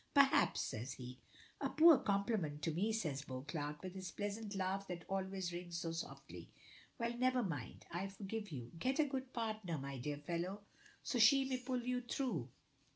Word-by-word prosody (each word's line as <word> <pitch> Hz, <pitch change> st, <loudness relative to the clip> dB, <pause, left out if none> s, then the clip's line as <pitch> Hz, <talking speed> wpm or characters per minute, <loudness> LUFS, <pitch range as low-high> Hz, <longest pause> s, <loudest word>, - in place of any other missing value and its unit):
"Perhaps," 280 Hz, -1 st, +6 dB
says 120 Hz, +4 st, -3 dB
he. 125 Hz, 0 st, -8 dB, 0.4 s
"A 275 Hz, -, +1 dB
poor 315 Hz, -2 st, +8 dB
compliment 200 Hz, -, 0 dB
to 165 Hz, -, +2 dB
me," 190 Hz, +8 st, +1 dB
says 155 Hz, -11 st, -1 dB
Beauclerk, 145 Hz, +2 st, -4 dB
with 185 Hz, -1 st, -5 dB
his 190 Hz, -2 st, -5 dB
pleasant 205 Hz, +3 st, -3 dB
laugh 195 Hz, +1 st, -1 dB
that 175 Hz, -2 st, -5 dB
always 190 Hz, -2 st, -2 dB
rings 175 Hz, -1 st, -4 dB
so 165 Hz, 0 st, -2 dB
softly. 165 Hz, 0 st, -6 dB, 0.5 s
"Well, 235 Hz, 0 st, -1 dB
never 255 Hz, 0 st, +3 dB
mind; 145 Hz, -, -4 dB
I 180 Hz, +3 st, -1 dB
forgive 200 Hz, +1 st, -5 dB
you. 120 Hz, -5 st, -6 dB
Get 260 Hz, +6 st, +1 dB
a 310 Hz, -, +5 dB
good 265 Hz, -2 st, -3 dB
partner, 215 Hz, -7 st, -2 dB
my 140 Hz, -1 st, -4 dB
dear 145 Hz, +3 st, -2 dB
fellow, 175 Hz, +6 st, -3 dB, 0.5 s
and 245 Hz, -, +4 dB
she 270 Hz, +5 st, +7 dB
may 260 Hz, -1 st, 0 dB
pull 250 Hz, -1 st, -2 dB
you 250 Hz, 0 st, 0 dB
through. 250 Hz, +1 st, -1 dB
195 Hz, 175 wpm, -39 LUFS, 165-235 Hz, 0.5 s, poor